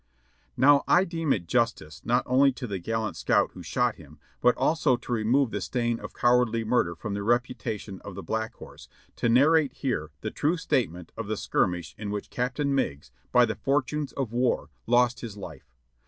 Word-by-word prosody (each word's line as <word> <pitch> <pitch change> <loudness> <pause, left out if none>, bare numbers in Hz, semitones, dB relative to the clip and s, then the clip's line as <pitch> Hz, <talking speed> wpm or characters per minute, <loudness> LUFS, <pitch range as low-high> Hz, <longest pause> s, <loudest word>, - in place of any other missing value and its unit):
Now 140 +1 +6
I 180 - +5
deem 165 -5 -2
it 90 -8 0
justice, 105 -8 -1
not 120 +1 +2
only 135 +2 +4
to 125 - -6
the 100 -5 -4
gallant 110 +4 -2
scout - - +2
who - - -10
shot - - 0
him, - - -15 0.2
but 125 0 +4
also 155 -5 +2
to 120 - -10
remove 120 +3 +2
the 105 - -3
stain 120 +3 -1
of - - -9
cowardly 120 -2 +2
murder 110 -7 +1
from 105 +4 -5
the 100 - -3
reputation 115 -3 -2
of 100 - -8
the 100 - -7
Black 110 0 -3
Horse, - - -13 0.3
to 120 - +1
narrate 140 +3 +4
here 120 - -2
the - - -3
true 160 +5 0
statement 95 - -1
of 115 -2 -5
the 110 0 -2
skirmish 90 -6 -1
in 105 -1 -4
which 105 0 -5
Captain 140 +3 -1
Meigs, 70 - -2 0.2
by 125 -1 +6
the 110 - -2
fortunes 140 +5 -1
of 130 -5 -3
war, 120 +1 0 0.2
lost 120 +1 +3
his 110 -5 -7
life. 80 -11 -10
120 Hz, 190 wpm, -27 LUFS, 105-135 Hz, 0.3 s, Now